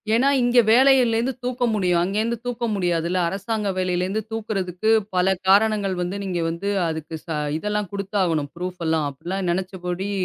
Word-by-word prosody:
ஏன்னா 255 +4 +3
இங்க 245 0 +4
வேலையில 255 -1 +5
இருந்து 245 +4 0
தூக்க 250 0 -2
முடியும். 180 -4 +2
அங்க 195 +3 -2
இருந்து 235 +1 -1
தூக்க 245 -1 -2
முடியாதுல. 175 -1 0
அரசாங்க 205 +2 -2
வேலையில 180 -1 0
இருந்து 200 +4 -2
தூக்குறதுக்கு 215 -2 -1 0.2
பல 180 +1 +3
காரணங்கள் 200 -1 +3
வந்து 180 +3 -3
நீங்க 185 -3 -2
வந்து 170 +5 -3 0.2
அதுக்கு 160 0 -5
ச - - -16 0.3
இதெல்லாம் 210 +2 -2
குடுத்தாவணும். 185 -7 -1
ப்ஃரூப்லாம். 170 -4 -1
அப்படில்லாம் 175 +7 -4
நினைச்சபடி 185 +1 -3
190 Hz, 150 wpm, -23 LUFS, 175-220 Hz, 0.3 s, வேலையில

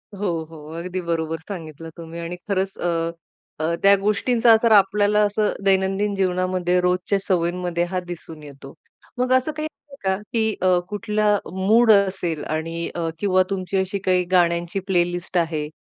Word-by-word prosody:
हो, 200 +1 -2 0.2
हो. 155 -2 -12
अगदी 180 +2 -4
बरोबर 165 -2 -2
सांगितलं 165 -4 -7
तुम्ही 165 0 -8
आणि 170 +1 -5
खरंच 195 -1 -1
अ, 165 -1 -1 0.5
अ, 160 +2 0
त्या 200 0 +7
गोष्टींचा 230 +3 +3
असर 225 +1 +3
आपल्याला 205 0 +4
असं 205 +1 0
दैनंदिन 195 +1 +2
जीवनामध्ये 185 -1 +1
रोजच्या 180 +2 +1
सवयींमध्ये 175 -2 -1
हां 185 +1 -3
दिसून 160 -3 -9
येतो. 140 -1 -12 0.4
मग 250 +1 0
असं 260 +4 +2
काही 310 0 -4
आहे 290 -2 -17
का 190 0 +1 0.2
की 220 -2 +1
अ, 185 -1 +4
कुठला 210 0 +1 0.2
मूड 220 +5 +4
असेल 190 -6 +1
आणि 165 +2 -3
अ, 170 -1 -2
किंवा 185 -2 +3
तुमची 195 0 -2
अशी 190 +1 -1
काही 185 -1 +3
गाण्यांची 175 +1 +2
प्लेलिस्ट 175 -1 0
आहे 160 -3 0
185 Hz, 155 wpm, -22 LUFS, 170-205 Hz, 0.5 s, त्या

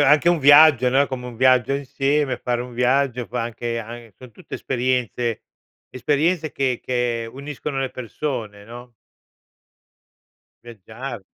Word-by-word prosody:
anche 150 +4 +4
un 175 -3 +2
viaggio, 145 -3 +7
no, 135 +3 +3
è - - -1
come 125 -2 -6
un 120 - -10
viaggio 130 0 +3
insieme, 140 +1 -1
fare 120 -1 -2
un 125 -1 -10
viaggio, 125 0 +1
fa 125 -1 -3
anche 115 0 -4
an 115 0 -9
son 125 -2 -13
tutte - - -9
esperienze 125 -2 -2 0.5
esperienze 155 +5 0
che 130 -3 -1
che 120 -2 -2
uniscono 140 +1 -6
le 135 -1 -2
persone, 115 -4 -5
no? 120 +2 -12 1.7
Viaggiare. 120 +1 -9
125 Hz, 135 wpm, -22 LUFS, 120-140 Hz, 1.7 s, viaggio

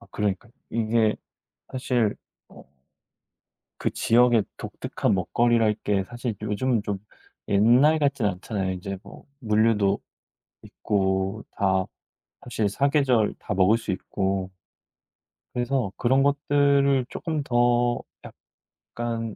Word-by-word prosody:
아 115 - -17
그러니까 105 +3 -2 0.2
이게 110 -1 +1 0.5
사실 125 -4 0 0.3
어 - - -15 1.1
그 - - -1
지역의 120 -2 +3
독특한 - - -2
먹거리랄 115 +4 +2
게 100 -2 0
사실 120 -1 -5
요즘은 110 +2 0
좀 100 -2 -2 0.5
옛날 120 +10 +5
같진 140 -6 +1
않잖아요, 95 0 -2
인제 95 +1 -6
뭐 - - -14
물류도 105 -3 +2 0.7
있고 95 +1 -1
다 95 -1 +1 0.6
사실 110 -4 -1
사계절 135 -3 +2
다 105 - -4
먹을 95 +4 +4
수 - - -10
있고. 95 0 -2 1.0
그래서 120 -4 -1
그런 130 +3 +2
것들을 140 -1 +2
쪼끔 160 -3 -3
더 120 -1 +2 0.2
약간 115 -2 -7
115 Hz, 215 characters per minute, -25 LUFS, 100-125 Hz, 1.1 s, 옛날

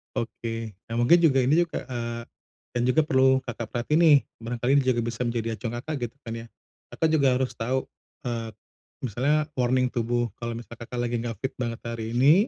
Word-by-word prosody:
Oke. 115 -1 -3 0.2
Nah, 115 - -4
mungkin 120 +9 +6
juga 135 -6 +4
ini 150 +6 +4
juga, 170 - -5
eee, 120 -2 -4 0.5
dan 120 - 0
juga 125 +5 +4
perlu 130 -2 +4
Kakak 120 -2 -5
perhatiin 125 +6 +1
nih, 160 -4 +8 0.2
barangkali 120 +2 -1
ini 140 - +4
juga 125 -2 +2
bisa 115 +1 -4
menjadi 115 -1 -1
acuan 115 0 -4
Kakak 155 +2 -4
gitu 115 - -23
kan 115 - -5
ya. - - -15 0.5
Kakak 160 - +2
juga 145 -4 +4
harus 130 0 0
tahu, 125 +3 0 0.4
eee, 115 -2 -3 0.5
misalnya 140 +6 +1
warning 125 0 +2
tubuh 120 0 0
kalau 120 0 -3
misal 120 0 -8
Kakak 120 +2 -7
lagi 120 0 0
enggak 115 -1 -3
fit 130 - -2
banget 120 -2 -3
hari 115 -1 -4
ini, 150 - +6
120 Hz, 190 wpm, -26 LUFS, 115-130 Hz, 0.5 s, nih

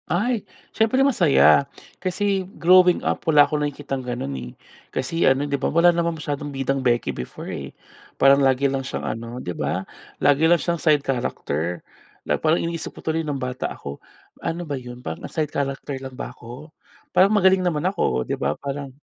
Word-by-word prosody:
Ay. 215 +8 +1 0.3
Siyempre 255 +5 +3
masaya, 170 - +4 0.3
kasi 195 0 -1
growing 180 +1 +5
up - - 0
wala 145 -2 +7
akong 150 -1 -2
nakikitang 145 -2 -3
gano'n, 120 - -4 0.2
eh. - - -12 0.4
Kasi 165 +6 0
ano, 135 +2 +2
'di 140 -1 -2
ba - - +1
wala 170 +2 +5
naman 170 -1 -1
masyadong 145 -1 -4
bidang 135 0 -1
beki 120 -2 +1
before, 60 - -7
eh. 70 -1 -6 0.5
Parang 140 +1 +6
lagi 135 0 +3
lang 135 -1 +1
siyang 130 - -5
ano, 115 +2 -5
'di 90 -8 -5
ba, - - -2 0.3
lagi 145 +3 +3
lang 175 - +6
siyang 170 0 -2
side 150 -3 +3
character. 85 - -2 0.4
Na - - +1
parang 160 +1 +3
iniisip 165 -1 -4
ko - - -9
tuloy 160 0 0
nung 150 -3 -3
bata 125 0 -3
ako, 70 0 -8 0.4
"Ano 175 +1 -3
ba 145 - -4
yun?" 125 -1 -10
parang, 80 0 -5
"Ah, - - -8
side 155 -2 -1
character 140 0 -3
lang 135 -1 -7
ba - - -5
ako?" 125 +6 -11 0.4
parang, 185 +2 +6
"Magaling 190 -2 +4
naman 160 -4 0
ako." 65 - 0
'di - - -2
ba, 70 +2 +1
parang, 140 0 -5
145 Hz, 185 wpm, -23 LUFS, 130-170 Hz, 0.5 s, wala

